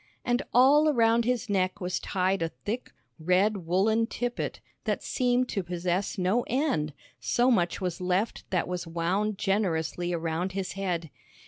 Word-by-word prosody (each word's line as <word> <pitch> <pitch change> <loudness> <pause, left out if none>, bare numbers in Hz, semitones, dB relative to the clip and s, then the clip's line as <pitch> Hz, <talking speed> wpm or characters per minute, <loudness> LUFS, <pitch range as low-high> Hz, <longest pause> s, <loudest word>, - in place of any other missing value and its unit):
And 245 +1 +2
all 285 +5 +6
around 230 -3 +3
his 250 -1 0
neck 190 -1 0
was 180 -2 -2
tied 190 0 0
a 165 - 0
thick, 225 +9 -5 0.3
red 185 +2 +1
woollen 215 +6 +2
tippet 245 0 -3 0.3
that - - -1
seemed 250 -1 +1
to 195 - -1
possess 180 +2 -2
no 190 +6 +2
end, 250 - 0 0.3
so 245 +2 +2
much 175 -7 +1
was 185 -2 -3
left 185 +5 -1
that 180 -3 0
was 180 -1 -4
wound 185 +5 -1
generously 175 -4 0
around 170 +2 -2
his 195 -1 -3
head. 175 -6 -3
190 Hz, 150 wpm, -28 LUFS, 175-230 Hz, 0.3 s, all